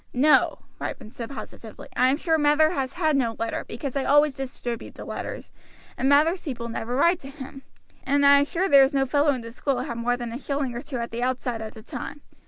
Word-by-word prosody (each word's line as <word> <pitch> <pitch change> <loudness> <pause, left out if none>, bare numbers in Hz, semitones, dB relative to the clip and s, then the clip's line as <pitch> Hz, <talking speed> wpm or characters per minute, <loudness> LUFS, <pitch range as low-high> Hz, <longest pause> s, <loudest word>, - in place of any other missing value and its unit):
"No," 295 +5 +4 0.2
Ripon 220 -4 -6
said 235 -2 -7
positively, 230 -5 -9
"I 255 - +4
am 275 - +2
sure 320 0 +1
Mather 300 +2 +4
has 270 -5 -2
had 315 -4 +1
no 235 -4 +1
letter, 230 0 -3
because 265 +3 -5
I 275 - 0
always 290 +1 +4
distribute 250 -3 -6
the - - -9
letters, - - -6 0.4
and 265 - +1
Mather's 315 +6 +4
people 235 -5 -5
never 230 +1 -3
write 340 +6 +3
to 270 - -10
him; 270 -1 -10 0.4
and 285 +1 +2
I 280 0 +8
am 285 - +2
sure 350 +6 -1
there 280 -6 +7
was 270 +2 +3
no 270 0 +3
fellow 290 +3 +2
in 260 -4 +1
the 230 0 -9
school 270 +2 -1
had 235 - -4
more 245 +1 0
than 240 -1 -5
a 240 - -5
shilling 280 -3 -2
or 240 - -5
two 280 -2 -6
at 235 0 -4
the 230 +1 -4
outside 250 -2 -1
at 220 -1 -7
that 220 - -12
time. 290 - -7
270 Hz, 235 wpm, -25 LUFS, 240-290 Hz, 0.4 s, I